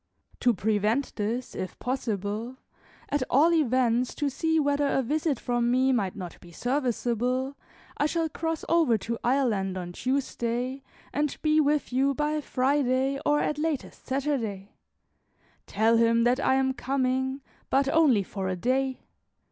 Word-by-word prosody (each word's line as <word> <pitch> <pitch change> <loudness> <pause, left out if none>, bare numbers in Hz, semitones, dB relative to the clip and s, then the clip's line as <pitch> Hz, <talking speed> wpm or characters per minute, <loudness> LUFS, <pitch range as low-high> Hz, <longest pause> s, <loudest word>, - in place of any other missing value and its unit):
To 245 - +4
prevent 215 +5 0
this, 230 +4 -3
if 185 - -5
possible, 225 -1 -3 0.5
at 290 -1 0
all 310 +6 +5
events 255 -5 +2
to 290 -2 -1
see 320 +4 +1
whether 285 -1 +1
a 270 -1 +1
visit 295 +1 0
from 240 -1 0
me 260 +2 +3
might 200 -7 0
not 180 -4 -8
be 175 - -15
serviceable, 250 - -1 0.4
I 295 - +2
shall 330 +1 0
cross 325 +1 -3
over 320 -9 +3
to 230 +3 -4
Ireland 225 -8 +1
on 175 -1 -5
Tuesday, 255 +2 -2 0.3
and 295 0 -1
be 310 0 +4
with 295 -3 0
you 270 +2 +2
by 300 +1 0
Friday, 270 0 +1
or 295 0 +3
at 300 - -1
latest 305 -3 -3
Saturday. 250 -8 -2 1.0
Tell 225 +3 +3
him 230 0 +4
that 245 +2 +3
I 265 - +2
am 265 0 +2
coming, 260 0 -1 0.3
but 270 +1 +2
only 280 -9 +4
for 190 0 -5
a 185 - -1
day. 260 +6 0
260 Hz, 150 wpm, -27 LUFS, 230-285 Hz, 1.0 s, all